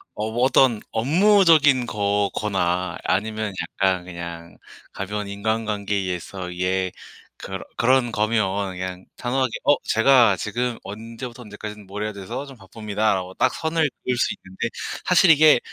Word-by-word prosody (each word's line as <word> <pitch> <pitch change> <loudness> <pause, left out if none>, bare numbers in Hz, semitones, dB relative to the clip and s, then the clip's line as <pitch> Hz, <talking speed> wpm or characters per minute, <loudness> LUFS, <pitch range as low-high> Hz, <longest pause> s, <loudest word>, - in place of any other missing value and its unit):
어 110 +1 -3
뭐 120 +2 0
어떤 130 -4 +4
업무적인 155 - +4
거거나 100 -4 -1
아니면 110 +1 -1
약간 95 +1 0
그냥 85 -1 -8 0.3
가벼운 105 +1 -4
인간관계에 105 0 -1
의해서 90 -1 -4
이게 90 +1 -1 0.5
그런 95 -1 -6
그런 125 0 +3
거면 100 -3 0
그냥 90 0 -6
단호하게 130 +1 0
"어 145 - +5
제가 115 -3 +5
지금 120 +5 -2
언제부터 115 +4 -8
언제까지 105 0 -8
뭘 100 +2 -6
해야 110 - -2
돼서 100 +8 -6
좀 135 -3 -12
바쁩니다."라고 100 -2 -2
딱 130 - +2
선을 160 -2 0
그을 125 -1 -1
수 - - +1
있는데 95 +5 -5 0.4
사실 180 0 +5
이게 155 -4 +6
105 Hz, 310 characters per minute, -23 LUFS, 95-125 Hz, 0.5 s, 이게